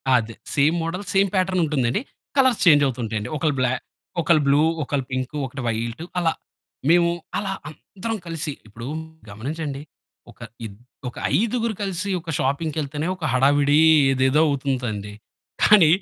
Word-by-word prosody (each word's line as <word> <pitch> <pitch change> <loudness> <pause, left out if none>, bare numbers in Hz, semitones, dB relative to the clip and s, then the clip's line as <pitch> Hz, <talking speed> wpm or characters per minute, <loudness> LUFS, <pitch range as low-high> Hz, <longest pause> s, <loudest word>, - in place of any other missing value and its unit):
అదే 115 -1 0 0.2
same 150 +3 +4
model, 180 +5 -3
same 195 0 +4
pattern 185 -1 +2
ఉంటుందండి 135 - 0 0.4
colours 260 -4 +4
change 145 -4 +7
అవుతూ 130 -2 -2
ఉంటాయండి 110 -1 -3
ఒకళ్ళు 150 -1 0
బ్లా 125 0 +2 0.5
ఒకళ్ళు 155 -2 +4
బ్లూ, 140 +2 +5 0.2
ఒకళ్ళు 135 -1 -2
పింకు, 130 +3 -3
ఒకటి 130 +1 -7
వైట్ 115 +5 -2 0.2
అలా. 165 -2 +2 0.6
మేము 170 0 +5 0.3
అలా 200 -1 -2 0.2
అందరం 215 +7 -6
కలిసి 165 -2 -3 0.2
ఇప్పుడు 115 +4 -9 0.4
గమనించండి 140 +6 -5 0.5
ఒక - - -24 0.3
ఇద్ 100 - -8 0.3
ఒక - - -14 0.2
ఐదుగురు 230 +1 0
కలిసి 195 0 -2
ఒక 165 0 -11
షాపింగ్‌కెళ్తేనే 150 +2 -1
ఒక 180 - -12
హడావిడి 145 +3 +4 0.3
ఏదేదో 130 +3 +3
అవుతుందండి. 125 -7 -2 0.5
కానీ 200 -7 +7
145 Hz, 140 wpm, -23 LUFS, 130-170 Hz, 0.6 s, change